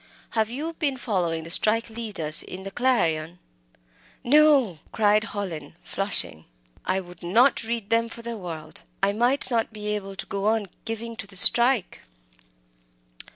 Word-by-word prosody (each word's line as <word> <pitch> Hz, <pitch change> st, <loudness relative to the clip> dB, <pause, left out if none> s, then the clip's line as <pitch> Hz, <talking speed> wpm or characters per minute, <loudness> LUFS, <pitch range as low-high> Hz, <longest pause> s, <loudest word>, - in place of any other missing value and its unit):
Have 220 Hz, -1 st, 0 dB
you 300 Hz, +7 st, -5 dB
been 285 Hz, -5 st, -2 dB
following 175 Hz, -9 st, -2 dB
the 165 Hz, -, -8 dB
strike 220 Hz, +5 st, +2 dB
'leaders' 205 Hz, -9 st, -2 dB
in 190 Hz, +1 st, -10 dB
the 195 Hz, -, -7 dB
Clarion?" 170 Hz, -10 st, -1 dB, 0.9 s
"No!" 275 Hz, -, +3 dB
cried 210 Hz, 0 st, +2 dB
Hallin, 170 Hz, -9 st, -6 dB
flushing. 85 Hz, -, -3 dB, 0.4 s
"I 185 Hz, +1 st, -1 dB
would 180 Hz, -2 st, -13 dB
not 225 Hz, +10 st, +2 dB
read 225 Hz, -2 st, -5 dB
them 230 Hz, 0 st, +1 dB
for 235 Hz, 0 st, -11 dB
the 235 Hz, 0 st, -5 dB
world! 165 Hz, -6 st, -8 dB, 0.2 s
I 200 Hz, +1 st, +2 dB
might 245 Hz, +5 st, +1 dB
not 230 Hz, -2 st, -1 dB
be 210 Hz, -1 st, -6 dB
able 200 Hz, -2 st, -5 dB
to -, -, -7 dB
go 200 Hz, +1 st, -4 dB
on 215 Hz, -3 st, 0 dB, 0.2 s
giving 225 Hz, +1 st, -6 dB
to 200 Hz, -, -7 dB
the 200 Hz, -, -14 dB
strike." 235 Hz, +2 st, +7 dB
210 Hz, 155 wpm, -24 LUFS, 180-235 Hz, 0.9 s, strike